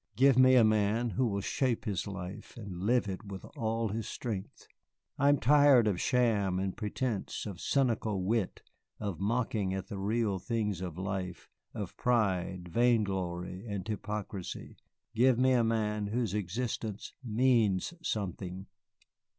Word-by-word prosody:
Give 135 Hz, +3 st, +5 dB
me 130 Hz, 0 st, +7 dB
a 120 Hz, -, +7 dB
man 110 Hz, +2 st, +2 dB
who 120 Hz, +7 st, +1 dB
will 100 Hz, -2 st, -1 dB
shape 125 Hz, +4 st, 0 dB
his 100 Hz, -2 st, -2 dB
life 95 Hz, +1 st, -7 dB
and 100 Hz, -6 st, -7 dB
live 120 Hz, +3 st, +2 dB
it 95 Hz, +2 st, -5 dB
with 100 Hz, -2 st, -8 dB
all 115 Hz, 0 st, -1 dB
his 110 Hz, +2 st, -3 dB
strength. 105 Hz, -6 st, -5 dB, 0.5 s
I 140 Hz, +1 st, +5 dB
am 145 Hz, -, +5 dB
tired 140 Hz, -2 st, +6 dB
of 100 Hz, -4 st, 0 dB
sham 105 Hz, -7 st, +2 dB
and 95 Hz, 0 st, -2 dB
pretence, 110 Hz, 0 st, -3 dB
of 100 Hz, -4 st, -6 dB
cynical 115 Hz, -7 st, +1 dB
wit, 105 Hz, 0 st, -1 dB, 0.4 s
of 100 Hz, -6 st, -4 dB
mocking 105 Hz, -3 st, 0 dB
at 95 Hz, +1 st, -5 dB
the 100 Hz, -4 st, -5 dB
real 105 Hz, -1 st, 0 dB
things 105 Hz, -1 st, -2 dB
of 90 Hz, -3 st, -5 dB
life, 95 Hz, -2 st, -4 dB, 0.3 s
of -, -, -5 dB
pride, 95 Hz, -7 st, 0 dB
vain 115 Hz, +5 st, +3 dB
glory, 90 Hz, -1 st, -3 dB
and 100 Hz, -2 st, -4 dB
hypocrisy. 105 Hz, -3 st, -5 dB, 0.4 s
Give 125 Hz, +1 st, +4 dB
me 130 Hz, +1 st, +4 dB
a 125 Hz, -2 st, +4 dB
man 105 Hz, -2 st, 0 dB
whose 110 Hz, -2 st, -1 dB
existence 105 Hz, +1 st, -3 dB
means 115 Hz, -, +2 dB
something." 95 Hz, -, -3 dB
105 Hz, 150 wpm, -31 LUFS, 95-120 Hz, 0.5 s, me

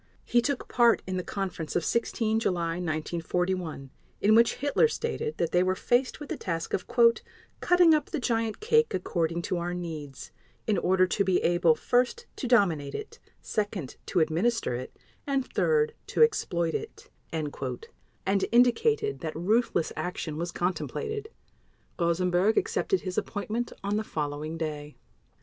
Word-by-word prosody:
He 240 Hz, -, +3 dB
took 280 Hz, +1 st, -2 dB
part 235 Hz, -1 st, +4 dB
in 185 Hz, 0 st, -3 dB
the 180 Hz, -, -2 dB
conference 185 Hz, -6 st, -4 dB
of 175 Hz, -, +1 dB
16 225 Hz, -1 st, 0 dB
July 170 Hz, -5 st, -1 dB
1941, 170 Hz, -2 st, -2 dB, 0.3 s
in 210 Hz, +2 st, +4 dB
which 230 Hz, +1 st, +5 dB
Hitler 285 Hz, -, +3 dB
stated 460 Hz, 0 st, -3 dB
that 165 Hz, -, 0 dB
they 180 Hz, -, +4 dB
were 185 Hz, 0 st, +1 dB
faced 245 Hz, +6 st, +1 dB
with 295 Hz, -, -8 dB
the -, -, -3 dB
task 165 Hz, -3 st, -4 dB
of 185 Hz, -, -1 dB, 0.7 s
"cutting 355 Hz, -2 st, +5 dB
up 305 Hz, -, +1 dB
the 320 Hz, -, -3 dB
giant 225 Hz, -3 st, -1 dB
cake 460 Hz, +1 st, +3 dB
according 170 Hz, -2 st, -1 dB
to 180 Hz, -, -1 dB
our 175 Hz, +1 st, -3 dB
needs, 155 Hz, -6 st, -7 dB, 0.3 s
in 215 Hz, -, +1 dB
order 185 Hz, 0 st, +3 dB
to 190 Hz, +2 st, 0 dB
be 190 Hz, -2 st, +1 dB
able: 170 Hz, -2 st, +4 dB
first, 250 Hz, -, +1 dB
to 260 Hz, -, -3 dB
dominate 175 Hz, -, +2 dB
it; 430 Hz, -, -7 dB, 0.2 s
second, 205 Hz, -9 st, -3 dB
to 180 Hz, -, +2 dB
administer 170 Hz, -, +1 dB
it; 125 Hz, +1 st, -6 dB, 0.3 s
and 275 Hz, -2 st, 0 dB
third, 455 Hz, -1 st, +2 dB
to -, -, +4 dB
exploit 170 Hz, -, +1 dB
it", 445 Hz, -, -6 dB, 0.2 s
and 155 Hz, +6 st, -3 dB
indicated 415 Hz, -, +3 dB
that 160 Hz, -2 st, -5 dB
ruthless 185 Hz, 0 st, +1 dB
action 180 Hz, -3 st, -4 dB
was 170 Hz, +2 st, -3 dB
contemplated. 430 Hz, -, -3 dB, 0.7 s
Rosenberg 180 Hz, +4 st, +2 dB
accepted 385 Hz, -3 st, +1 dB
his 185 Hz, -1 st, -1 dB
appointment 220 Hz, +3 st, -3 dB
on 200 Hz, +1 st, 0 dB
the 215 Hz, -, -1 dB
following 150 Hz, -2 st, -4 dB
day. 150 Hz, -2 st, -5 dB
185 Hz, 150 wpm, -28 LUFS, 165-245 Hz, 0.7 s, which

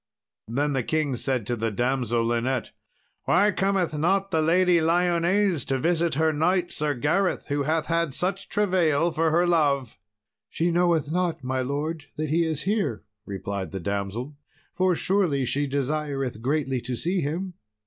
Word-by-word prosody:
Then 140 Hz, +6 st, 0 dB
said -, -, -1 dB
the 135 Hz, -, +1 dB
king 155 Hz, -1 st, 0 dB, 0.3 s
to 120 Hz, -, -1 dB
the 115 Hz, 0 st, -1 dB
damsel 120 Hz, 0 st, 0 dB
Linet, 120 Hz, +3 st, -1 dB, 0.5 s
"Why 200 Hz, +4 st, +4 dB
cometh 190 Hz, -4 st, 0 dB
not 190 Hz, +6 st, +1 dB
the 160 Hz, -3 st, +2 dB
Lady 175 Hz, +2 st, +4 dB
Lyones 175 Hz, -, +2 dB
to 135 Hz, -, +1 dB
visit 170 Hz, +2 st, +1 dB
her 160 Hz, +1 st, +2 dB
knight, 175 Hz, +4 st, +1 dB
Sir 150 Hz, -1 st, -1 dB
Gareth, 165 Hz, +10 st, 0 dB
who 145 Hz, 0 st, 0 dB
hath 155 Hz, +3 st, 0 dB
had 165 Hz, -4 st, 0 dB
such 190 Hz, +2 st, -2 dB
travail 175 Hz, -6 st, +2 dB
for 160 Hz, 0 st, +1 dB
her 170 Hz, +3 st, +3 dB
love?" 145 Hz, -7 st, +1 dB, 0.5 s
"She 170 Hz, +2 st, 0 dB
knoweth 170 Hz, -4 st, +2 dB
not, 170 Hz, -4 st, -1 dB
my 130 Hz, +1 st, -1 dB
lord, 145 Hz, +4 st, -3 dB
that 155 Hz, -1 st, -3 dB
he 165 Hz, +1 st, +2 dB
is 155 Hz, -2 st, -2 dB
here," 195 Hz, -, -1 dB, 0.2 s
replied 100 Hz, -1 st, -4 dB
the 95 Hz, -, -4 dB
damsel, 100 Hz, -, -3 dB, 0.4 s
"for 185 Hz, -1 st, +2 dB
truly 170 Hz, -8 st, +1 dB
she 145 Hz, +4 st, 0 dB
desireth 140 Hz, -3 st, -2 dB
greatly 135 Hz, -1 st, 0 dB
to 125 Hz, +1 st, -3 dB
see 175 Hz, +8 st, -1 dB
him." 175 Hz, +6 st, -3 dB
155 Hz, 160 wpm, -25 LUFS, 135-175 Hz, 0.5 s, Why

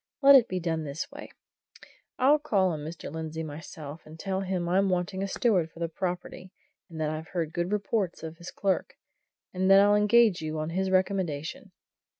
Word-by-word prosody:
Let 280 Hz, +1 st, +9 dB
it 255 Hz, -4 st, +7 dB
be 185 Hz, -, -2 dB
done 165 Hz, -2 st, -2 dB
this 145 Hz, +1 st, -5 dB
way: -, -, -9 dB, 0.9 s
I'll 280 Hz, +4 st, +4 dB
call 200 Hz, -11 st, +1 dB
on 155 Hz, -, -4 dB
Mr. 155 Hz, -1 st, -7 dB
Lindsey 160 Hz, 0 st, -4 dB
myself, 155 Hz, 0 st, -8 dB
and 155 Hz, +1 st, -13 dB
tell 190 Hz, +1 st, -2 dB
him 185 Hz, -2 st, -2 dB
I'm 190 Hz, +2 st, +2 dB
wanting 185 Hz, +1 st, -1 dB
a 195 Hz, -, -1 dB
steward 190 Hz, -5 st, +1 dB
for -, -, -20 dB
the 170 Hz, -, -1 dB
property, 180 Hz, +1 st, -5 dB, 0.4 s
and 165 Hz, -2 st, -9 dB
that 155 Hz, -1 st, 0 dB
I've 155 Hz, +1 st, -5 dB
heard 165 Hz, -4 st, -3 dB
good 175 Hz, +2 st, -2 dB
reports 200 Hz, -3 st, -1 dB
of 160 Hz, 0 st, -7 dB
his 170 Hz, 0 st, -9 dB
clerk, 195 Hz, -2 st, -1 dB, 0.6 s
and 185 Hz, +1 st, +1 dB
that 195 Hz, 0 st, +8 dB
I'll 205 Hz, +1 st, +5 dB
engage 210 Hz, -2 st, +4 dB
you 155 Hz, 0 st, -4 dB
on 155 Hz, +1 st, -3 dB
his 190 Hz, +2 st, -1 dB
recommendation. 185 Hz, -, -1 dB
180 Hz, 190 wpm, -28 LUFS, 160-195 Hz, 0.9 s, Let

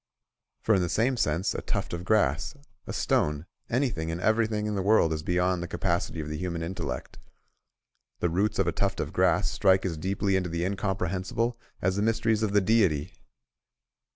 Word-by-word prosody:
For 110 Hz, -, +3 dB
in 95 Hz, -, +3 dB
the 90 Hz, -, -1 dB
same 115 Hz, -, +2 dB
sense 85 Hz, -4 st, 0 dB
a -, -, -4 dB
tuft -, -, -3 dB
of 85 Hz, 0 st, -4 dB
grass, 95 Hz, -, +1 dB, 0.3 s
a -, -, -4 dB
stone, 75 Hz, +1 st, 0 dB, 0.2 s
anything 115 Hz, -, 0 dB
and 80 Hz, +1 st, -3 dB
everything 110 Hz, +1 st, +1 dB
in 105 Hz, -, -1 dB
the 100 Hz, -, -1 dB
world 95 Hz, -5 st, +4 dB
is 80 Hz, -, -3 dB
beyond 90 Hz, +2 st, +1 dB
the 85 Hz, -, -4 dB
capacity 80 Hz, -, -1 dB
of 75 Hz, -, -4 dB
the 75 Hz, 0 st, -4 dB
human 85 Hz, -2 st, -3 dB
intellect: 90 Hz, +3 st, -5 dB, 1.0 s
the 90 Hz, -, +1 dB
roots 100 Hz, +5 st, 0 dB
of -, -, +2 dB
a -, -, +1 dB
tuft -, -, -1 dB
of -, -, -3 dB
grass -, -, +2 dB
strike 95 Hz, 0 st, +3 dB
as 85 Hz, -4 st, -2 dB
deeply 95 Hz, +4 st, 0 dB
into 90 Hz, -2 st, 0 dB
the 85 Hz, +1 st, -1 dB
incomprehensible 95 Hz, +4 st, -1 dB, 0.3 s
as 95 Hz, +1 st, +1 dB
the -, -, +1 dB
mysteries 115 Hz, 0 st, +1 dB
of 110 Hz, -2 st, 0 dB
the 105 Hz, 0 st, +4 dB
Deity. 95 Hz, -8 st, +2 dB
95 Hz, 185 wpm, -27 LUFS, 85-105 Hz, 1.0 s, world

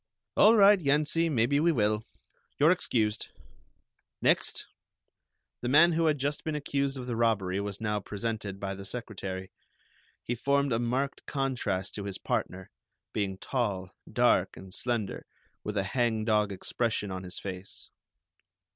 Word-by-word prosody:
"All 220 Hz, +2 st, +7 dB
right, 200 Hz, 0 st, +7 dB
Yensie, 155 Hz, +2 st, +2 dB
maybe 135 Hz, +1 st, +2 dB
we 170 Hz, +3 st, +4 dB
will. 105 Hz, -5 st, +1 dB, 0.5 s
You're 150 Hz, +3 st, +6 dB
excused. 110 Hz, -12 st, 0 dB, 0.9 s
Next." -, -, +2 dB, 1.0 s
The 120 Hz, -, -2 dB
man 165 Hz, +6 st, +7 dB
who 165 Hz, 0 st, +2 dB
had 150 Hz, -1 st, +2 dB
just 145 Hz, +2 st, -2 dB
been 155 Hz, -1 st, -2 dB
accused 140 Hz, -2 st, -1 dB
of 125 Hz, -, -5 dB
the 120 Hz, -2 st, -3 dB
robbery 100 Hz, -5 st, +1 dB
was 100 Hz, -1 st, -5 dB
now 105 Hz, -1 st, -1 dB
presented 105 Hz, -1 st, -4 dB
by 100 Hz, -1 st, -3 dB
the 100 Hz, 0 st, -8 dB
secretary. 95 Hz, -4 st, -6 dB, 0.7 s
He 120 Hz, -, -2 dB
formed 140 Hz, +2 st, +1 dB
a 115 Hz, -, +1 dB
marked 130 Hz, +4 st, -2 dB
contrast 125 Hz, -9 st, -1 dB
to 100 Hz, -, -5 dB
his 100 Hz, -2 st, -4 dB
partner, 95 Hz, 0 st, -3 dB, 0.4 s
being 100 Hz, -2 st, -1 dB
tall, 100 Hz, -6 st, -2 dB, 0.2 s
dark -, -, +3 dB
and 95 Hz, -1 st, -11 dB
slender, 115 Hz, -3 st, -2 dB, 0.4 s
with 105 Hz, 0 st, -3 dB
a 100 Hz, -, +2 dB
hangdog 110 Hz, -2 st, +1 dB
expression 105 Hz, +1 st, -2 dB
on 95 Hz, 0 st, -4 dB
his 90 Hz, 0 st, -7 dB
face. 95 Hz, -1 st, -7 dB
115 Hz, 145 wpm, -29 LUFS, 100-140 Hz, 1.0 s, All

